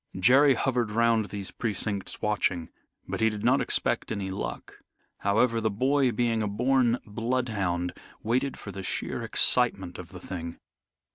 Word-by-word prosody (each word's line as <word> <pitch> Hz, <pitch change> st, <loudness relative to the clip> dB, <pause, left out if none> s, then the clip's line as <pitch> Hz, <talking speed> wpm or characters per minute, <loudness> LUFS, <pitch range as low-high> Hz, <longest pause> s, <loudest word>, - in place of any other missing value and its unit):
Jerry 130 Hz, +8 st, +6 dB
hovered 120 Hz, -2 st, 0 dB
round 115 Hz, 0 st, +2 dB
these 100 Hz, -2 st, -6 dB
precincts 100 Hz, -2 st, -3 dB
watching, 95 Hz, -5 st, 0 dB, 0.4 s
but -, -, -4 dB
he 110 Hz, -, +4 dB
did 105 Hz, -1 st, -6 dB
not -, -, +4 dB
expect -, -, 0 dB
any 100 Hz, -3 st, -3 dB
luck. 95 Hz, -, -6 dB, 0.4 s
However, 115 Hz, +3 st, +2 dB
the 110 Hz, -, +1 dB
boy, 130 Hz, +5 st, +2 dB
being 115 Hz, 0 st, 0 dB
a 105 Hz, -, 0 dB
born 125 Hz, +3 st, +2 dB
bloodhound, 105 Hz, -6 st, -1 dB, 0.3 s
waited 130 Hz, +5 st, 0 dB
for 100 Hz, -, -8 dB
the 95 Hz, -, -7 dB
sheer 95 Hz, -, -3 dB
excitement 95 Hz, -8 st, +2 dB
of 90 Hz, -2 st, -9 dB
the 90 Hz, -1 st, -10 dB
thing. 85 Hz, -2 st, -6 dB
110 Hz, 150 wpm, -27 LUFS, 100-120 Hz, 0.4 s, Jerry